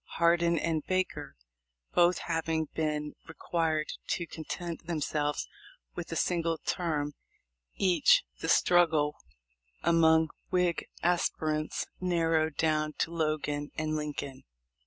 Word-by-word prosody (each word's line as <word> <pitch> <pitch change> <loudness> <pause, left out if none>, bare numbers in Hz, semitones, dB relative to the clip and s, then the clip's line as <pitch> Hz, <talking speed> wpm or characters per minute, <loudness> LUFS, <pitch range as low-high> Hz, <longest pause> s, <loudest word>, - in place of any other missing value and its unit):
Hardin 170 0 +3
and 160 -1 0
Baker 185 - -2 0.6
both 175 +1 +4
having 165 -1 -1
been 150 -1 -2
required 160 -1 -1
to 170 - -1
content 165 +1 -6
themselves 150 -2 -1 0.5
with - - -6
a - - -2
single 165 -2 0
term 150 -4 -2 0.6
each, 200 - +4 0.2
the - - -3
struggle 160 -4 +4 0.7
among 160 -1 +4 0.2
Whig 180 -2 +1 0.2
aspirants 155 -3 0
narrowed 165 -3 +1
down 155 -1 +1
to 165 - -2
Logan 155 -2 -1
and 155 0 -1
Lincoln. 145 -3 -4
160 Hz, 105 wpm, -30 LUFS, 155-170 Hz, 0.7 s, both